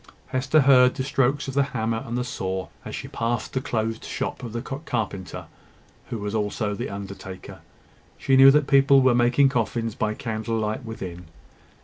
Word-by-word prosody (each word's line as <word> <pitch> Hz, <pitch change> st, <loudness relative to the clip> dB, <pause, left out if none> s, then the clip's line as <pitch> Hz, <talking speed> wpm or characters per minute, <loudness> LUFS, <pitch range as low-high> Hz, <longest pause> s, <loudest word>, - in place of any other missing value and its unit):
Hester 140 Hz, +4 st, +2 dB
heard 130 Hz, -2 st, +6 dB
the 130 Hz, -, -2 dB
strokes 135 Hz, 0 st, 0 dB
of 135 Hz, -, -4 dB
the 140 Hz, -, +3 dB, 0.2 s
hammer 115 Hz, 0 st, -1 dB
and 120 Hz, +1 st, -3 dB
the 125 Hz, -, 0 dB
saw 95 Hz, -6 st, -4 dB
as -, -, -6 dB
she -, -, -6 dB
passed 115 Hz, +1 st, -2 dB
the 130 Hz, -, -1 dB
closed 115 Hz, -2 st, -2 dB
shop -, -, -4 dB
of 120 Hz, -3 st, -6 dB
the 115 Hz, -, -3 dB
carpenter, 115 Hz, -, -4 dB, 0.6 s
who 115 Hz, -, -3 dB
was 105 Hz, 0 st, -4 dB
also 105 Hz, 0 st, -1 dB
the 100 Hz, -, -4 dB
undertaker. 100 Hz, -1 st, -8 dB, 0.6 s
She 135 Hz, -, +2 dB
knew 135 Hz, +1 st, +9 dB
that 150 Hz, +1 st, +4 dB
people 135 Hz, -1 st, +5 dB
were 130 Hz, -1 st, +5 dB
making 120 Hz, +3 st, +4 dB
coffins 115 Hz, -2 st, -1 dB
by 110 Hz, 0 st, -2 dB
candlelight 110 Hz, 0 st, -3 dB
within. 90 Hz, -6 st, -7 dB
115 Hz, 170 wpm, -24 LUFS, 110-135 Hz, 0.6 s, knew